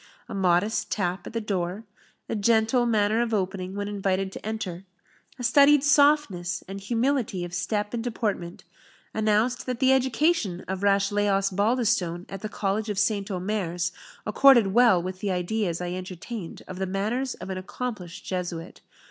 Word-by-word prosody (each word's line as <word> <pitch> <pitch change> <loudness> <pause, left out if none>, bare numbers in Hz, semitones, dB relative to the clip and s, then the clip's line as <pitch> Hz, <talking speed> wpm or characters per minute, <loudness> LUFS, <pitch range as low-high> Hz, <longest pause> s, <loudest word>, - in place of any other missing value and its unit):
A - - -7
modest 190 +2 +1
tap 180 -2 -2
at - - -8
the 230 - -1
door, 195 -1 -2 0.4
a - - -2
gentle 225 +3 +3
manner 215 0 +2
of 230 -2 0
opening 190 -1 -3
when 205 0 -3
invited 195 -1 -1
to - - -9
enter, 200 -5 -4 0.5
a 250 - -7
studied 280 +3 +6
softness 285 - +3
and 195 +1 -7
humility 230 -3 0
of 175 - -9
step 205 +4 -2
and 230 -1 -2
deportment, 210 -7 -3 0.5
announced 220 +4 +1
that 250 -2 -2
the 265 0 +5
education 260 - +1
of 190 0 -3
Rashleigh 200 +1 +2
Osbaldistone 195 -2 +1
at 195 -1 -7
the 215 - -4
College 210 +1 -2
of 205 - -2
St. 205 0 +1
Omers 180 -2 -2 0.3
accorded 230 -3 +5
well 235 -6 +6
with 185 +1 -5
the 205 - -2
ideas 180 -1 -1
I 180 0 -3
entertained 185 +1 -7
of 185 0 -7
the 190 - -1
manners 220 +8 -1
of 185 +1 -7
an 185 - -3
accomplished 190 -3 -6
Jesuit. 175 -2 -5
205 Hz, 160 wpm, -26 LUFS, 185-230 Hz, 0.5 s, studied